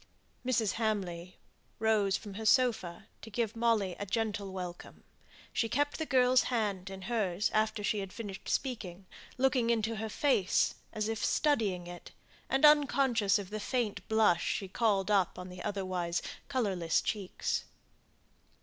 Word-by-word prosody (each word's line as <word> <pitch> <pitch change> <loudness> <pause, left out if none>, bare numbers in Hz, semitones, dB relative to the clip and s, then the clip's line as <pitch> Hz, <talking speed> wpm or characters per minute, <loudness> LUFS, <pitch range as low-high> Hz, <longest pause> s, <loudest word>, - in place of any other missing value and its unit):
Mrs. 230 -5 +1
Hamley 185 -5 -2 0.4
rose 215 -3 +2
from 205 -2 -9
her 220 +3 -6
sofa 220 -9 +2 0.2
to 225 - -9
give 225 +1 -2
Molly 225 -6 +1
a 205 - -3
gentle 210 -2 -2
welcome; 180 -2 -7 0.5
she 225 - 0
kept 290 +4 0
the 315 - -2
girl's 255 -1 +4
hand 205 -6 -1
in 190 -1 -8
hers 205 -4 0
after 215 0 +1
she 210 +1 0
had 195 -1 -5
finished 200 -3 -7
speaking, 200 -9 -3 0.3
looking 255 -2 +2
into 225 -1 +1
her 220 0 -3
face, 215 -6 +2 0.2
as 215 0 -2
if 225 -1 -3
studying 215 - +1
it, 175 0 -9 0.4
and 270 +3 +4
unconscious 270 -8 +4
of 200 -1 -7
the 215 - -3
faint 215 -5 -2
blush 220 -6 +3
she 195 - -2
called 200 -1 +1
up 195 -4 +2
on 180 0 -7
the 180 0 -9
otherwise 185 -4 -2 0.2
colourless 195 - 0
cheeks. 200 -4 -2
210 Hz, 150 wpm, -31 LUFS, 190-230 Hz, 0.5 s, girl's